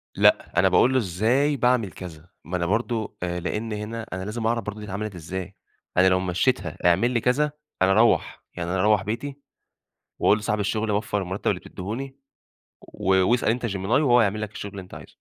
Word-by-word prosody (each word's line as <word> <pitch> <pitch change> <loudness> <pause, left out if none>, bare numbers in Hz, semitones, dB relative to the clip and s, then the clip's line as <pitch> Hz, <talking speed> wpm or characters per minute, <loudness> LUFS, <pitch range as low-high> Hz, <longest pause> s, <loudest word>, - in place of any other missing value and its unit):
لأ، 85 - +3
أنا 95 - +5
باقول 120 +7 +4
له - - +3
إزاي 120 - +1
باعمِل 125 -5 +2
كذا، 85 -2 -10 0.2
ما 90 +1 -2
أنا 85 - -1
برضه، 110 +3 -1
آآ 90 0 -2
لإن 105 +5 -3
هنا 110 +2 -5
أنا 95 0 -4
لازم 110 +2 -2
أعرف 115 0 0
برضه 105 0 -6
دي 105 - -7
اتعملت 100 0 -5
إزاي؟ 95 +3 -6 0.4
أنا 95 +1 +6
لو 95 - +3
مشّيتها 95 0 0
اعمل 95 +8 +4
لي 120 - +1
كذا، 145 +4 +2 0.3
أنا 95 - +5
أروّح 110 +4 +2
يعني 85 -1 -4
أنا 95 +1 -1
أروّح 105 0 +3
بيتي 135 +7 -4 0.8
وأقُول 105 - +4
لصاحب 105 0 -1
الشغل 105 +2 -1
وفّر 105 0 -1
المرتب 95 +2 -2
اللي - - -3
بتديهوني، 130 +8 -6 0.6
و 95 0 +1
واسأل 120 -2 +2
أنت 120 +1 0
gemini 100 - -2
وهو 120 +2 +4
هيعمل 105 -1 +1
لك 110 -1 -4
الشغل 100 -2 -7
اللي 100 - -7
أنت 90 - -15
عايزه. - - -11
105 Hz, 195 wpm, -24 LUFS, 95-115 Hz, 0.8 s, أنا